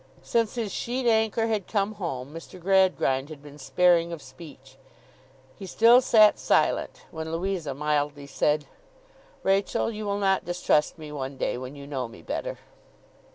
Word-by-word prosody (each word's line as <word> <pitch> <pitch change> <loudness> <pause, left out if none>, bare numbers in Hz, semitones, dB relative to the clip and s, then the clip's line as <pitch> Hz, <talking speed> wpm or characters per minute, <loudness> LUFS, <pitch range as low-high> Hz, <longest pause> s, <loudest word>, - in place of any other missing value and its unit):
Since 230 -1 0
his 225 -4 -3
sheet 250 +2 -3
anchor 220 -1 +2
had 215 -4 -1
come 205 -1 0
home, 145 -9 -5
Mr. 165 +2 -10
Gradgrind 180 -7 +2
had 150 -2 -11
been 145 0 -13
sparing 170 +3 +3
of 170 - -5
speech. 135 -1 -14 0.8
He 195 - -9
still 235 +6 +6
sat 215 -4 +5
silent, - - +1
when 160 0 -6
Louisa 170 -4 -3
mildly 145 0 -1
said: 150 +1 0 0.8
'Rachael, 195 +3 +1
you 215 -1 -6
will 200 0 -1
not 195 -1 +1
distrust 175 -3 +1
me 155 -2 -9
one 135 -2 -5
day, - - -1
when 130 +3 -7
you 140 -1 -10
know 135 -4 -4
me 115 - -14
better. - - -4
170 Hz, 155 wpm, -26 LUFS, 145-200 Hz, 0.8 s, still